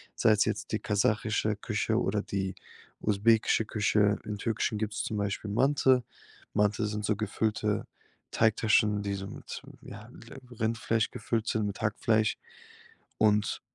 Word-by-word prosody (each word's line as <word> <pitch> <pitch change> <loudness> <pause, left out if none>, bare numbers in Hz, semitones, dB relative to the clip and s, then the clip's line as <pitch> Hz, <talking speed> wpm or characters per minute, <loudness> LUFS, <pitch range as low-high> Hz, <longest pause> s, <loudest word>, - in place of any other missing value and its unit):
sei's 105 -1 +4
jetzt - - -3
die - - 0
kasachische 105 +1 +1
Küche 110 +1 -1
oder 105 -2 0
die 95 -1 -3 0.5
usbekische 110 +1 +3
Küche. 105 -1 +2
Im 105 -1 -5
Türkischen 115 -1 -1
gibt's 110 -1 -2
zum 105 - -3
Beispiel 100 +1 -2
Manti. 130 +2 +3 0.5
Manti 105 +1 +2
sind 105 0 -3
so 110 - +1
gefüllte 105 0 -1 0.5
Teigtaschen, 110 -2 +3
die 100 - -2
so 95 0 -5
mit - - -8
m - - -13 0.2
ja, 105 +3 -10
l 120 +1 -13 0.2
Rindfleisch 115 0 0
gefüllt 115 0 -2
sind, 110 -2 0
mit 100 - -6
Hackfleisch. 110 0 +1 0.8
Und 105 -1 +2
105 Hz, 140 wpm, -29 LUFS, 105-110 Hz, 0.8 s, sei's